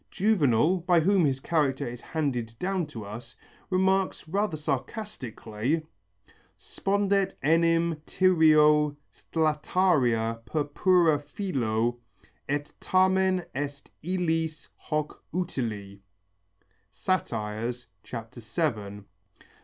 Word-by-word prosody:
Juvenal, 180 - +3
by 175 -1 +3
whom 190 0 +3
his 135 -2 +1
character 140 -4 0
is 120 0 -7
handed 125 -8 -2
down 185 0 -1
to 115 -8 -8
us, 115 +4 -9 0.3
remarks 190 -2 +1
rather 195 -1 -1
sarcastically: 140 - -3 0.7
Spondet 200 0 0
enim 165 +1 +3
Tyrio 155 -4 +4 0.2
stlataria 150 -8 +1
purpura 160 +2 +2
filo, 120 - -1 0.5
Et 145 +1 -2
tamen 185 -1 +2
est 140 +1 -5
illis 165 -3 -1
hoc 150 0 -4
utile 115 - -3 0.9
(Sat. 185 0 0
VII). 110 - -4
150 Hz, 85 wpm, -27 LUFS, 120-180 Hz, 0.9 s, Tyrio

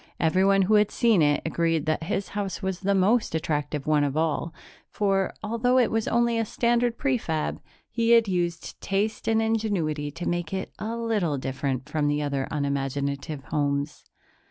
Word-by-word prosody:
Everyone 190 +4 +3
who 205 +4 +2
had 210 -1 +5
seen 230 -8 +3
it 145 -1 +2
agreed 165 -2 0
that 155 +1 -1
his 195 +2 -2
house 200 -1 -4
was 190 -1 -2
the 200 +1 +1
most 205 0 +2
attractive 150 -2 -2
one 150 -1 +3
of 145 +1 -1
all, 160 +1 0 0.4
for, 195 -2 0
although 230 +4 +1
it 245 -3 +3
was 225 -1 0
only 235 -1 +2
a - - +2
standard 235 +1 +1
prefab, 225 - -1 0.3
he 230 0 0
had 230 -2 +6
used 175 -3 -2
taste 205 +3 -1
and 225 0 +3
ingenuity 195 -10 -1
to 165 +4 -6
make 175 +1 -2
it 190 - -4
a 225 +2 -3
little 210 -10 0
different 135 0 -3
from 150 -1 0
the 145 0 +1
other 140 -2 -2
unimaginative 140 0 -2
homes. 145 0 -1
175 Hz, 170 wpm, -26 LUFS, 150-220 Hz, 0.4 s, had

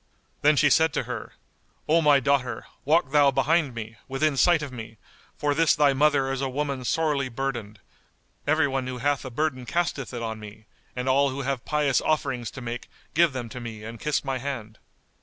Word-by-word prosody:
Then 150 +1 +5
she 145 0 +4
said 160 -2 +4
to - - 0
her, 120 -2 -6 0.5
"O 165 +2 +4
my 145 -3 +5
daughter, 130 -3 0 0.2
walk 150 -1 +3
thou 145 -1 +5
behind 145 -1 +1
me, 110 0 -7
within 140 +2 +1
sight 165 +2 +4
of 145 - -6
me, 110 -2 -9 0.4
for 145 -1 +1
this 165 +1 +3
thy 145 -2 +4
mother 135 -1 +3
is 135 0 -2
a 135 - -1
woman 140 -1 -2
sorely 145 -1 0
burdened; 115 -4 -4 0.7
everyone 140 -4 +1
who 130 -1 -4
hath 145 +2 0
a - - -4
burden 130 0 -1
casteth 165 -2 -2
it 120 -2 -5
on 110 -1 -4
me 105 0 -11 0.3
and 125 +1 -3
all 140 +2 +4
who 135 +1 -4
have 135 -2 -2
pious 150 -3 +2
offerings[FN#190] 125 -7 -1
to 130 - -8
make 120 0 -6 0.2
give 170 0 +4
them 125 -3 -5
to 125 - -7
me 115 -3 -7
and 115 +1 -8
kiss 150 -1 -1
my 135 -1 -1
hand." 120 -5 -6
135 Hz, 195 wpm, -26 LUFS, 120-150 Hz, 0.7 s, Then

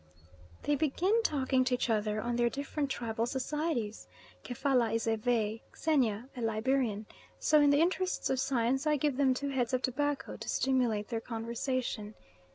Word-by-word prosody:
They 295 - +1
begin 335 +10 +2
talking 265 -8 +1
to 255 0 +1
each 245 - -1
other 215 -2 0
on 240 +2 -2
their 240 0 +2
different 280 +2 -3
tribal 230 -3 -2
societies; 265 -4 -2 0.4
Kefalla 250 -1 +1
is 225 - -1
a 225 -1 +2
Vey, 220 -1 0 0.2
Xenia 250 -8 +1
a 245 - -6
Liberian, 225 -1 0 0.3
so 305 -1 +4
in 290 - +5
the 285 +1 +4
interests 370 +2 0
of 265 - +1
Science 265 +3 +1
I 300 -1 +3
give 285 -1 0
them 265 -2 +3
two 280 +2 -2
heads 255 -3 -1
of 255 - -2
tobacco 290 +2 -1
to - - -7
stimulate 245 -6 +1
their 230 -2 -2
conversation. 230 -1 -3
255 Hz, 165 wpm, -31 LUFS, 230-285 Hz, 0.4 s, in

